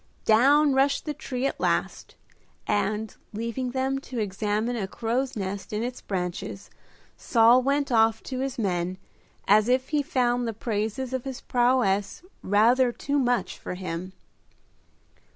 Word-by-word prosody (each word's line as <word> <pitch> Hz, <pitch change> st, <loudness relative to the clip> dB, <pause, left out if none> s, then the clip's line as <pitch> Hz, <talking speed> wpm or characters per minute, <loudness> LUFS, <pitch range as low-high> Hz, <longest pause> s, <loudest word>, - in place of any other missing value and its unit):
Down 275 Hz, +6 st, +5 dB
rushed 275 Hz, +1 st, +2 dB
the 300 Hz, -, -2 dB
tree 260 Hz, -2 st, -4 dB
at -, -, -2 dB
last, -, -, -1 dB, 0.5 s
and, 210 Hz, +1 st, -1 dB, 0.2 s
leaving 235 Hz, +4 st, -3 dB
them 265 Hz, +1 st, -1 dB
to 260 Hz, -2 st, -8 dB
examine 210 Hz, +3 st, -1 dB
a 205 Hz, -5 st, -2 dB
crow's 245 Hz, +6 st, -2 dB
nest 195 Hz, -1 st, -4 dB
in 215 Hz, +1 st, -2 dB
its 250 Hz, +1 st, -5 dB
branches, 180 Hz, +1 st, -5 dB, 0.5 s
Saul 235 Hz, +2 st, +5 dB
went 280 Hz, +1 st, 0 dB
off 225 Hz, -1 st, +3 dB
to 260 Hz, -1 st, -5 dB
his 270 Hz, 0 st, -3 dB
men, 185 Hz, -4 st, -1 dB, 0.5 s
as 215 Hz, +3 st, +5 dB
if 255 Hz, +1 st, +1 dB
he 300 Hz, -1 st, +1 dB
found 245 Hz, -3 st, 0 dB
the 225 Hz, -, -2 dB
praises 225 Hz, +4 st, -3 dB
of 260 Hz, -2 st, -2 dB
his 265 Hz, -2 st, -6 dB
prowess 240 Hz, -, +1 dB, 0.2 s
rather 240 Hz, +5 st, +3 dB
too 285 Hz, +4 st, -1 dB
much 245 Hz, -2 st, 0 dB
for -, -, -6 dB
him. 185 Hz, 0 st, -5 dB
240 Hz, 145 wpm, -26 LUFS, 210-260 Hz, 0.5 s, Down